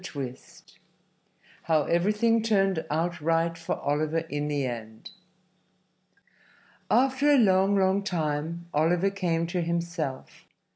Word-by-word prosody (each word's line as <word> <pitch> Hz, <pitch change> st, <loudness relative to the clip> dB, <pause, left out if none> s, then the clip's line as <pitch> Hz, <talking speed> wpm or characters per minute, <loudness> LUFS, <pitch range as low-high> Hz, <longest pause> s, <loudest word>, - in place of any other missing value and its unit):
III 130 Hz, -3 st, -4 dB, 1.3 s
HOW 160 Hz, -2 st, +2 dB
EVERYTHING 210 Hz, +8 st, +2 dB
TURNED 195 Hz, -6 st, +1 dB
OUT 165 Hz, +2 st, -1 dB
RIGHT 165 Hz, +1 st, +1 dB
FOR 165 Hz, 0 st, -3 dB
OLIVER 155 Hz, +3 st, 0 dB
IN 145 Hz, +1 st, -2 dB
THE 145 Hz, -2 st, -1 dB
END 110 Hz, -, -7 dB, 1.8 s
After 265 Hz, +3 st, +3 dB
a 290 Hz, -, +6 dB
long, 195 Hz, -3 st, +4 dB
long 190 Hz, 0 st, +2 dB
time 165 Hz, -2 st, -3 dB
Oliver 175 Hz, +6 st, +2 dB
came 170 Hz, -4 st, -1 dB
to 175 Hz, +1 st, -2 dB
himself. 170 Hz, -5 st, -4 dB
170 Hz, 110 wpm, -27 LUFS, 150-195 Hz, 1.8 s, a